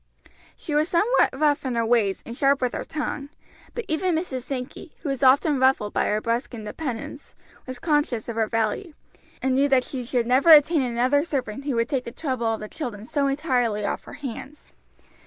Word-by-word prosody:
She 305 - -6
was 305 +3 +2
somewhat 430 +9 +3
rough 295 -2 +2
in 255 -3 -2
her 230 -1 +1
ways 225 -4 +1
and 235 - -7
sharp 275 +1 +3
with 250 -1 -1
her - - -3
tongue; 300 -2 -4 0.5
but 475 - -4
even 335 +2 0
Mrs. 315 -6 -3
Sankey, 260 +6 -7
who 305 - -4
was 270 -2 -2
often 275 +2 +4
ruffled 260 -6 +2
by - - +1
her 210 - +1
brusque 235 +3 -2
independence, 235 +4 -6 0.3
was 255 -1 -6
conscious 295 -8 0
of 235 - -4
her 225 -1 +1
value, 225 - -2 0.5
and 265 0 +2
knew 275 +2 +3
that 265 -2 +4
she 255 -1 -5
should 240 0 -1
never 260 +6 +3
obtain 305 +1 +6
another 255 +3 +1
servant 275 -5 -4
who 280 -4 -1
would 230 0 +1
take 265 -3 -1
the 235 - -6
trouble 255 -4 -2
of 220 - -3
the 215 - -5
children 230 -7 -6
so 280 +2 0
entirely 250 -7 0
off - - -3
her - - -11
hands. 275 +1 -8
260 Hz, 200 wpm, -24 LUFS, 235-295 Hz, 0.5 s, obtain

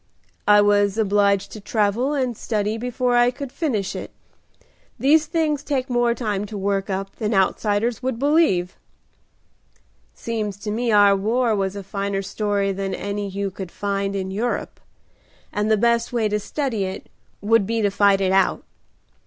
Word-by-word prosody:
"I 205 0 +7
was 205 0 +3
obliged 200 -2 +2
to 215 - -9
travel 220 +7 0
and 255 -4 -1
study 210 -1 -2
before 245 +1 -1
I 240 0 +5
could 255 +1 -7
finish 230 - -2
it. - - -6 0.9
These 305 +3 +3
things 310 -3 0
take 275 -3 -2
more 240 -1 +2
time 210 -4 -2
to 210 - -7
work 195 0 -1
up 195 0 -4
than 215 -1 -1
outsiders 205 +4 +1
would 260 -2 -2
believe." 275 - +2 1.4
"Seems 215 -4 -3
to 210 - -3
me 235 +2 0
our 205 -1 +6
war 225 +3 +1
was 195 -1 -1
a 200 - -6
finer 200 0 -3
story 200 0 -1
than 195 0 -3
any 205 0 -4
you 200 0 -3
could 185 -2 -8
find 200 -1 -2
in 190 -1 -3
Europe, 230 +5 -3 0.7
and 210 +1 0
the 220 - +4
best 235 +1 +1
way 235 -3 +1
to 210 0 0
study 230 -3 -2
it 190 - -6 0.3
would 210 -1 +2
be 225 0 0
to 205 - +2
fight 200 -1 +3
it 190 -1 +1
out. 190 0 +2
210 Hz, 165 wpm, -22 LUFS, 200-240 Hz, 1.4 s, I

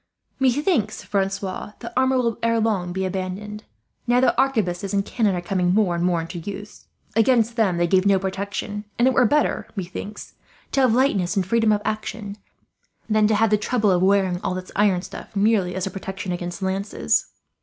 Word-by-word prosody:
"Methinks, 265 - +1
Francois, 195 0 -2
that 235 - -8
armour 260 0 +3
will 235 -3 0
ere 230 0 +2
long 205 -5 0
be 190 +1 -2
abandoned, 190 +3 -5 0.4
now 240 +1 +4
that 260 - +3
arquebuses 205 -7 0
and 200 0 +1
cannon 210 -5 +1
are 175 - -2
coming 180 0 0
more 205 -5 +3
and 170 0 -1
more 175 -1 +2
into 165 +2 -5
use. 205 +4 -8 0.3
Against 230 0 +3
them 205 -7 +2
they 175 - +2
give 185 +2 +3
no 200 -1 +5
protection; 200 +2 -4
and 240 - +4
it 260 - +3
were 250 - +4
better, 295 +5 +1
methinks, 195 +2 -6 0.4
to 275 - +2
have 250 -3 +4
lightness 205 -9 +2
and 195 -2 +1
freedom 225 +2 +2
of 210 0 +1
action, 215 -1 -4 0.7
than 215 -1 +3
to 215 - +2
have 220 0 +2
the 210 - +3
trouble 215 -1 +1
of 180 -1 +2
wearing 190 -2 +2
all 190 -1 -2
this 185 0 -7
iron 195 -3 +2
stuff - - -10
merely 200 -3 +2
as 185 - -2
a 195 - -4
protection 190 -1 -5
against 175 +1 -4
lances. 195 +2 0
200 Hz, 190 wpm, -23 LUFS, 185-225 Hz, 0.7 s, no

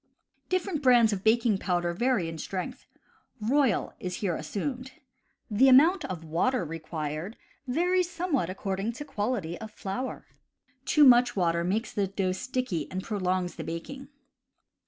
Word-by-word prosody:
Different 370 -4 -1
brands 240 -5 +5
of 190 -1 -4
baking 225 -2 +3
powder 175 -2 0
vary 235 -2 +1
in 165 -1 -6
strength; 185 +3 -5 0.5
Royal 245 0 +1
is 180 -1 -4
here 185 -5 -1
assumed. 250 - -4 0.6
The 255 +6 +5
amount 325 +8 +6
of 175 -3 -5
water 175 +7 0
required 155 +3 -5 0.3
varies 355 +6 +1
somewhat 335 - -1
according 195 +3 -3
to 295 +5 -7
quality 205 - -3
of 220 - -6
flour. 215 +5 -5 0.6
Too 300 - +5
much 245 -2 +6
water 170 -3 +1
makes 215 +6 -1
the 200 -2 0
dough 190 -1 -1
sticky 225 - -3
and 185 0 -4
prolongs 185 -4 -1
the - - -4
baking. 265 +12 -6
210 Hz, 140 wpm, -28 LUFS, 180-255 Hz, 0.6 s, amount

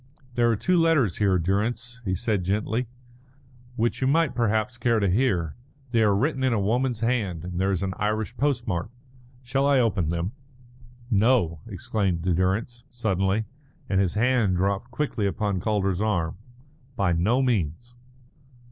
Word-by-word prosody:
"There 120 -1 +3
are 115 - +3
two 180 - +2
letters 155 - +3
here, 100 -3 +3
Durrance," 110 +7 -1
he 95 -1 0
said 105 -1 -1
gently, 105 +6 -1 0.9
"which 120 +2 -1
you 130 - +2
might 160 +1 +2
perhaps 110 0 0
care 115 -1 +1
to 100 - +1
hear. 90 - +1 0.4
They 115 -2 +3
are 105 -2 +4
written 130 +5 0
in 130 -2 +2
a 110 - +1
woman's 120 +3 0
hand, 105 -9 -1
and 90 0 -3
there 95 +1 +2
is 95 -1 -1
an 95 -1 -2
Irish 110 +3 -1
postmark. 120 -11 -1 0.5
Shall 135 +3 +1
I 140 -2 +4
open 95 -9 +1
them?" 85 +3 -2 0.8
"No," 105 -7 +3
exclaimed 95 -3 -2
Durrance, 95 +7 0
suddenly, 105 -3 0 0.4
and 95 -1 +2
his 95 0 0
hand 115 -4 +2
dropped 100 +5 -1
quickly 120 -5 -1
upon 100 -1 -1
Calder's 100 -2 0
arm. 90 -7 0 0.6
"By 95 -5 +1
no 110 +11 +2
means." 120 - -1
110 Hz, 155 wpm, -25 LUFS, 95-120 Hz, 0.9 s, are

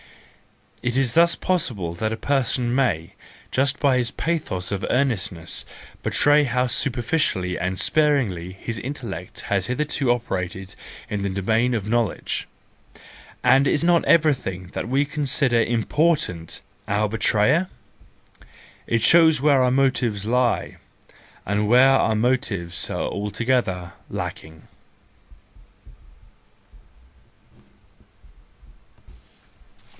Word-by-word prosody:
It 120 +1 -1
is 130 -3 +1
thus 170 0 +5
possible 110 - -2
that 110 +6 -2
a 110 - -3
person 125 -2 0
may, 100 -12 0 0.4
just 135 +1 +1
by 135 -3 +3
his 120 -2 0
pathos 150 - -3
of 100 0 -3
earnestness, 95 -11 -1 0.4
betray 145 +1 +3
how 125 0 0
superficially 120 - 0
and 90 +2 -3
sparingly 105 - +1
his 110 +4 -5
intellect 115 -9 -6
has 100 -2 -1
hitherto 135 0 0
operated 95 -5 -3 0.3
in 105 -1 -3
the 100 - -1
domain 110 +6 0
of 105 -3 -3
knowledge.—And 120 +3 -2
is 145 - +2
not 170 -1 +3
everything 130 - +1
that - - -4
we 140 +3 +2
con¬ 145 0 -4
sider 125 -4 +3
important 120 - 0 0.3
our 105 +2 +1
betrayer? 110 - +2 1.2
It 115 -1 0
shows 160 -3 +5
where 140 -1 +4
our 125 - +3
motives 125 -6 +1
lie, 125 +1 0 0.7
and 105 +1 0
where 125 +4 +6
our 115 -4 +2
motives 105 -7 -1
are - - -2
altogether 105 -4 -2 0.2
lacking. 80 0 -7
120 Hz, 105 wpm, -23 LUFS, 100-135 Hz, 1.2 s, where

